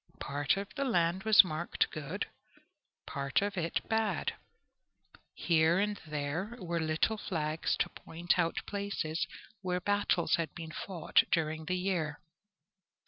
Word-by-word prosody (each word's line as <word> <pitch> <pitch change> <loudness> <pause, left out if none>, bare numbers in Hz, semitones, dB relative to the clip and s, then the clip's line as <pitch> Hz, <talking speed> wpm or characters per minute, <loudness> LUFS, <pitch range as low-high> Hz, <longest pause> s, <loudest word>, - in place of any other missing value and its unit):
Part 145 +4 0
of 200 0 -3
the 280 - -1
land 185 -5 +1
was 220 -2 +9
marked 170 -1 -1
good, 155 +6 -3 0.8
part 140 +6 0
of 205 0 -2
it 170 -2 -1
bad. 220 -2 0 1.0
Here 165 0 +3
and 205 +1 0
there 155 +9 -3
were 170 -5 -2
little 160 +7 +1
flags 155 -4 -1
to - - +1
point 170 +2 -1
out 165 -1 0
places 170 -6 -2 0.3
where 180 -1 -1
battles 200 -4 +2
had 165 -1 -3
been 165 -1 -7
fought 175 -1 +1
during 160 -1 0
the 180 +2 0
year. 175 -6 -1
170 Hz, 135 wpm, -32 LUFS, 155-200 Hz, 1.0 s, was